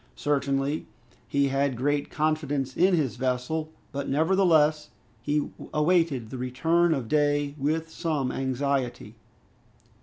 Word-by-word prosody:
Certainly, 140 0 -1 0.4
he 140 -1 +1
had 135 -2 0
great 145 +3 0
confidence 150 -4 -1
in 185 +1 +4
his 135 -9 -1
vessel, 130 +5 -2 0.2
but 140 -1 -4
nevertheless 155 -1 +3 0.3
he 150 0 -1 0.2
awaited 150 -7 +1
the 130 - -5
return 160 +7 +2
of 130 -5 -4
day 145 0 +1
with 160 +4 0
some 150 -7 -1
anxiety. 135 -1 -2
145 Hz, 115 wpm, -26 LUFS, 135-155 Hz, 0.4 s, in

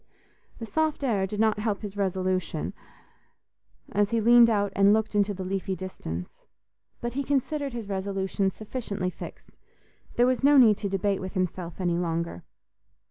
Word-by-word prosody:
The 230 - -6
soft 310 +4 -1
air 205 -7 +1
did 210 +2 -5
not 220 -1 +2
help 210 -1 -2
his 205 -1 -6
resolution, 185 -1 -1 1.2
as 205 0 +2
he 230 - +1
leaned 235 +1 +7
out 205 -2 +1
and 200 +1 +5
looked 220 0 0
into 205 0 +2
the 190 -1 -5
leafy 190 0 -2
distance. 90 - -7 0.6
But 240 0 -3
he 280 +2 -1
considered 285 0 -1
his 230 -4 -5
resolution 195 0 -1
sufficiently 205 -3 -4
fixed: - - -11 0.6
there 240 - +4
was 255 +1 +1
no 285 +1 +6
need 220 -6 +7
to 200 - -3
debate 195 0 0
with 190 0 -6
himself 180 -2 -3
any 175 -2 0
longer. 165 - -2
200 Hz, 160 wpm, -27 LUFS, 190-230 Hz, 1.2 s, leaned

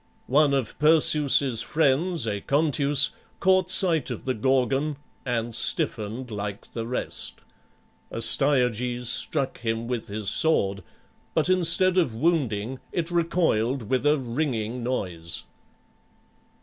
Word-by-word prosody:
One 145 +2 +3
of 130 -5 -3
Perseus's 145 -5 +4
friends, 155 +2 0
Aconteus, 140 +6 +3 0.3
caught 185 -1 +2
sight 180 -6 +2
of - - -6
the 130 - 0
Gorgon 135 +4 0 0.3
and 120 -1 -2
stiffened 110 +4 -2
like 100 0 -6
the 115 -1 -5
rest. 125 - -4 0.7
Astyages 125 -1 +1
struck 135 +1 -1
him 115 -1 -3
with 120 -2 -4
his 105 0 -5
sword, 100 -9 +2 0.5
but 160 +2 +1
instead 185 +1 +3
of 135 -11 -1
wounding, 130 -5 -1
it 175 -1 -3
recoiled 140 - 0
with 130 - +1
a 150 +1 +3
ringing 125 -3 -3
noise. 90 -9 -4
130 Hz, 110 wpm, -25 LUFS, 115-155 Hz, 0.7 s, Perseus's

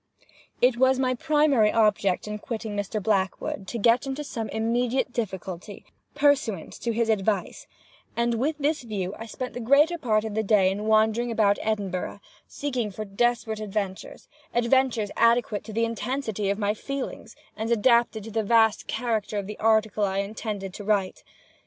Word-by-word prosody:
It 250 -1 +4
was 260 +1 +4
my 255 -1 +1
primary 275 -5 +3
object 210 -4 +2
upon 210 0 -5
quitting 220 -2 -5
Mr. 205 +1 -2
Blackwood, 190 -1 -1
to 235 - -4
get 235 +5 +3
into 270 +2 -3
some 230 -6 -5
immediate 240 +3 0
difficulty, 190 -3 -5 0.3
pursuant 275 - +1
to 235 - -1
his 230 0 0
advice, 205 -3 -1 0.5
and 235 0 +1
with 300 +5 0
this 300 +1 0
view 200 -5 -4
I 225 - -7
spent 250 +2 -6
the - - -5
greater 290 +8 +4
part 215 -5 +1
of 220 - -4
the 220 - +1
day 195 -3 +3
in 205 +2 -4
wandering 220 +2 +3
about 210 -3 +2
Edinburgh, 200 -3 -2 0.3
seeking 255 -6 -3
for 215 +2 -6
desperate 220 +1 0
adventures—adventures 215 +3 -1
adequate 230 -2 +2
to 220 - -8
the 230 +2 +1
intensity 230 -3 -2
of 200 - 0
my 205 -1 0
feelings, 275 +4 -6 0.2
and 220 +1 -3
adapted 235 -1 +3
to 225 - -8
the 220 +1 0
vast 220 0 +3
character 220 -3 -2
of 200 - -2
the 210 +1 -8
article 220 -1 +2
I 195 -1 0
intended 200 -1 -4
to 205 - -8
write. 200 -2 0
220 Hz, 165 wpm, -26 LUFS, 205-240 Hz, 0.5 s, It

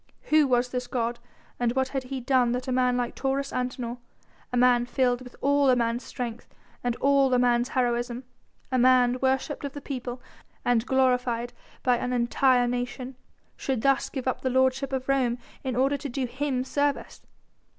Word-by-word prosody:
Who 305 -2 +5
was 250 -1 +2
this 250 0 -3
god? 235 -1 -2 0.4
and 240 -1 +1
what 265 0 0
had 265 -2 -3
he 265 +1 -4
done 250 -1 +2
that 250 +2 -3
a - - -1
man 250 -1 +2
like 245 -1 -2
Taurus 275 +1 -2
Antinor 250 -1 -3 0.5
a 250 - -1
man 245 -1 +4
filled 245 -1 +1
with 250 -1 -11
all 285 0 +3
a 255 - +5
man's 235 0 0
strength 240 -2 -6 0.4
and 245 -1 0
all 275 0 +3
a 250 - +4
man's 245 0 +2
heroism, 240 -1 -1 0.5
a 255 - +2
man 250 0 +4
worshipped 265 +3 0
of 280 -1 -4
the 290 - -6
people 250 -3 -5 0.5
and 245 -1 +2
glorified 250 -2 +1 0.3
by 250 -1 +3
an 250 +1 -2
entire 245 +1 +3
nation 245 +1 -4 0.4
should 260 -5 -2
thus 275 -1 +2
give 265 -2 -5
up 260 - -1
the 260 - 0
lordship 260 +1 +1
of 260 -1 -3
Rome 260 -3 +1 0.3
in 260 -3 -2
order 270 +3 +2
to 280 +1 -6
do 260 +1 -2
him 260 +1 -2
service? 285 +2 -2
255 Hz, 180 wpm, -26 LUFS, 245-265 Hz, 0.5 s, Who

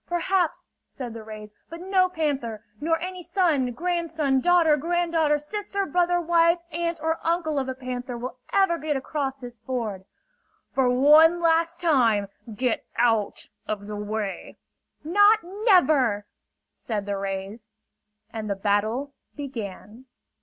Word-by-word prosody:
"Perhaps," 350 0 -1 0.2
said 245 -4 -7
the 230 - -8
rays; 215 -1 -10 0.2
"but 335 - -8
no 370 0 +2
panther, 275 - -2 0.2
nor 325 +2 +1
any 365 +1 -5
son, 335 -8 +1
grandson, 325 -2 0
daughter, 340 0 +4
granddaughter, 330 -1 +1
sister, 400 +5 -3
brother, 350 +1 +1
wife, 335 0 +3
aunt 335 +1 -2
or 320 0 0
uncle 325 -3 0
of 265 -1 -3
a 260 - -3
panther 250 -1 -5
will 255 +1 -6
ever 385 -4 +3
get 300 -1 -1
across 270 0 -3
this 245 -3 -10
ford! 220 -7 -4 0.7
"For 265 -2 +2
one 305 +7 +6
last 335 0 +2
time, 235 - +2 0.2
get 240 +2 -1
out 225 -3 +1 0.2
of 205 -1 -3
the 210 0 -6
way!" 210 -1 -4 0.5
"Not 410 +7 +5
never!" 335 - +3 0.5
said 210 -3 -4
the 200 0 -2
rays. 195 +3 -5 0.7
And 220 -2 -5
the 200 - 0
battle 215 +8 0 0.2
began. 230 -4 -7
285 Hz, 135 wpm, -25 LUFS, 225-340 Hz, 0.7 s, one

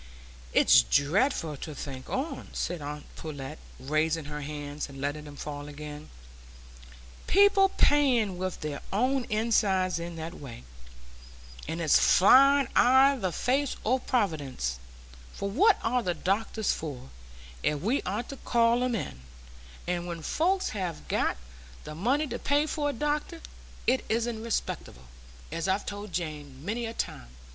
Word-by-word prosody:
"It's 60 - +7
dreadful 155 - +1
to 150 +2 -7
think 130 -2 -7
on," 275 +5 -3
said 175 -3 -3
aunt 150 +1 -6
Pullet, 150 -1 -7 0.2
raising 155 +3 0
her 150 0 -5
hands 145 0 -5
and 135 0 -10
letting 145 +2 -3
them 145 -1 -10
fall 145 0 -6
again, 150 0 -8 1.2
"people 395 0 +5
playing 245 - +3
with 185 -1 -3
their 150 -2 -4
own 255 +5 +1
insides 200 -5 +1
in 170 0 -6
that 165 +1 -6
way! 125 - -10 1.0
And 160 +2 -3
it's 160 -3 +4
flying 275 +7 +6
i' 265 +3 +6
the 190 -8 -2
face 270 +8 0
o' 255 +4 +2
Providence; 145 - -1 0.5
for 200 - -4
what 400 - +5
are 245 +2 +1
the 180 -6 -1
doctors 205 +5 0
for, 135 - -7 0.5
if 150 -1 0
we 235 +9 +1
aren't 210 +6 -3
to 275 - -7
call 235 0 +2
'em 250 -2 0
in? 65 - -5 0.6
And 175 0 -2
when 170 -2 -6
folks 370 - +1
have 185 -6 -4
got - - +1 0.5
the - - -7
money 250 - +1
to 280 - -5
pay 290 +2 +2
for 300 -2 -1
a - - -2
doctor, 295 +5 -2 0.5
it 260 +1 +2
isn't 230 0 -1
respectable, 65 - -3 0.5
as 165 +1 -2
I've 190 +2 0
told 205 0 -6
Jane 150 -5 -5
many 230 +3 -2
a 225 - -5
time. - - -4
185 Hz, 150 wpm, -28 LUFS, 150-250 Hz, 1.2 s, It's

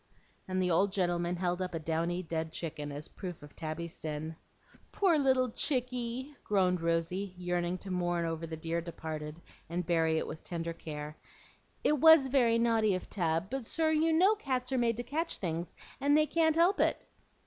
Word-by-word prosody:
and 185 0 -1
the 180 -1 +2
old 190 +4 +3
gentleman 175 -2 0
held 180 0 -1
up 180 -2 -3
a - - -1
downy 165 +3 -1
dead 160 -1 -3
chicken, 150 -3 -5
as 145 +1 -5
proof 180 -5 -8
of 145 - -13
Tabby's 160 +1 -4
sin. 155 +1 -5 0.6
"Poor 375 -5 +3
little 260 -3 +3
chicky!" 250 +1 -2
groaned 185 -4 +2
Rosy, 170 +3 -1
yearning 175 0 -1
to 190 +1 -8
mourn 175 -1 0
over 165 0 -3
the 160 0 -6
dear 165 +1 -2
departed 160 -2 -6 0.3
and 175 +1 -2
bury 160 -2 +2
it - - -1
with 155 - -8
tender 170 -1 -4
care. 150 -2 -7 0.7
"It 300 -1 +3
WAS 320 -3 +8
very 240 -4 +4
naughty 225 -3 +3
of 185 - -6
Tab; 170 +1 0
but, 265 -4 -3
sir, 320 -1 +2
you 315 +1 +3
know 365 +6 +5
cats 260 -10 -2
are 260 - +1
made 230 -2 +1
to 240 - -3
catch 315 +7 -1
things, 170 -2 -3 0.2
and 285 +2 +4
they 305 - +5
can't 320 0 +2
help 345 +4 +4
it." - - +1
180 Hz, 185 wpm, -31 LUFS, 165-250 Hz, 0.7 s, WAS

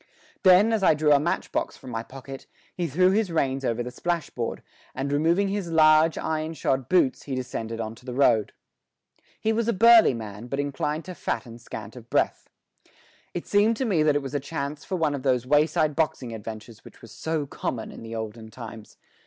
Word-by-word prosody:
Then, 195 +3 +6
as 220 - +1
I 185 - +5
drew 150 0 +2
a 145 - +6
matchbox 165 +4 -2
from 130 - -10
my 115 -1 -2
pocket, 135 +2 -10 0.3
he 175 -2 -1
threw 185 +6 +3
his 205 -2 +1
reins 135 -4 0
over 120 -1 -1
the 125 - -6
splashboard, 165 -8 -3 0.3
and 135 +2 -2
removing 170 +7 +2
his 195 -3 -3
large, 155 0 +5
iron 160 0 -2
shod 130 -4 -1
boots 175 -8 +2
he 135 - -3
descended 115 -3 -4
on 110 -1 -4
to 120 - -17
the 125 -2 -5
road. 115 -6 +3 0.9
He 220 - +1
was 230 0 0
a 235 - +2
burly 225 - +7
man, 110 0 -7
but 135 +3 -3
inclined 150 +2 -2
to 185 - -7
fat 160 - -3
and 115 0 -11
scant 110 -1 -8
of 120 -2 -12
breath. - - 0 0.9
It 175 - -4
seemed 210 +2 +3
to 265 - -1
me 190 -9 +2
that 150 -1 +3
it 145 - 0
was 135 - -6
a 145 - 0
chance 145 +1 -5
for 190 - -3
one 160 -4 +1
of 140 - -4
those 130 -2 +1
wayside 150 +1 +2
boxing 135 -7 -1
adventures 110 +1 -8
which - - -16
were - - -10
so 160 +6 -3
common 120 -4 -4
in - - -11
the 115 0 -7
olden 110 0 -6
times. 110 -1 -10
145 Hz, 205 wpm, -25 LUFS, 120-165 Hz, 0.9 s, burly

